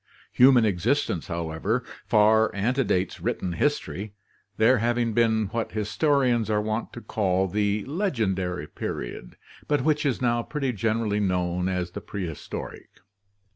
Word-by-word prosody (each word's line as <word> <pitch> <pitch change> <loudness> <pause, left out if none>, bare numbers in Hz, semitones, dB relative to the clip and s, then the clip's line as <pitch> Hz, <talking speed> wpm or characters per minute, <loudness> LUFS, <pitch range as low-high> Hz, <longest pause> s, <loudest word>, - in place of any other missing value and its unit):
Human 125 -2 +6
existence, 100 - 0
however, 85 +8 -2 0.2
far 110 0 +4
antedates 100 -4 0
written 90 - -2
history, 105 -4 -2 0.4
there 115 +3 +4
having 120 0 0
been 110 -1 +2
what 115 -1 -3
historians 120 +1 +1
are 105 -1 +2
wont 110 +2 -2
to 120 - -8
call 95 -4 0
the 105 +2 0
legendary 105 - -1
period, - - -6 0.3
but 145 -1 +2
which 150 -1 +2
is 140 -5 0
now 120 -1 +1
pretty 135 0 -2
gen 110 +2 0
erally 105 -2 0
known 90 -1 0
as 90 -2 -2
the - - -6
prehistoric. 90 -6 -6
110 Hz, 135 wpm, -26 LUFS, 95-120 Hz, 0.4 s, Human